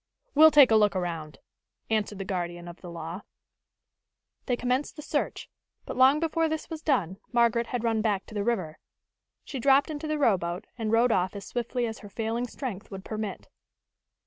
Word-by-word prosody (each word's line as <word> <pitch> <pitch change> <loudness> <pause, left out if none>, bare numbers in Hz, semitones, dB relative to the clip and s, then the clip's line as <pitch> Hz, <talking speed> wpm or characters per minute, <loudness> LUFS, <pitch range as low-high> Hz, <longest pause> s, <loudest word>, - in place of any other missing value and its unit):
"We'll 315 +2 +8
take 285 -5 +7
a - - +6
look 210 -2 +4
around," 165 -4 -3 0.5
answered 210 -2 0
the 195 - -5
guardian 175 -2 -4
of 175 +1 -10
the 180 - -8
law. 170 +2 -6 1.3
They 245 - +2
commenced 250 +4 -1
the 300 - -8
search, - - -2 0.4
but - - -5
long 265 +3 +6
before 325 0 +1
this 315 +1 -4
was 320 -1 -5
done 195 - 0
Margaret 235 -1 +3
had 245 -2 -3
run 225 -2 +1
back 205 -3 0
to - - -13
the 205 -1 -1
river. 190 -9 -2 0.7
She 270 - -5
dropped 275 +4 +4
into 305 +1 -5
the 305 0 -1
rowboat, 185 -8 +1
and 225 -3 -2
rowed 230 +2 +4
off 185 -1 +1
as 200 - -7
swiftly 245 0 -2
as 225 -1 -5
her 205 - -11
failing 225 +3 -2
strength 235 -6 -6
would 195 -1 -8
permit. 215 -2 -5
225 Hz, 185 wpm, -27 LUFS, 190-260 Hz, 1.3 s, We'll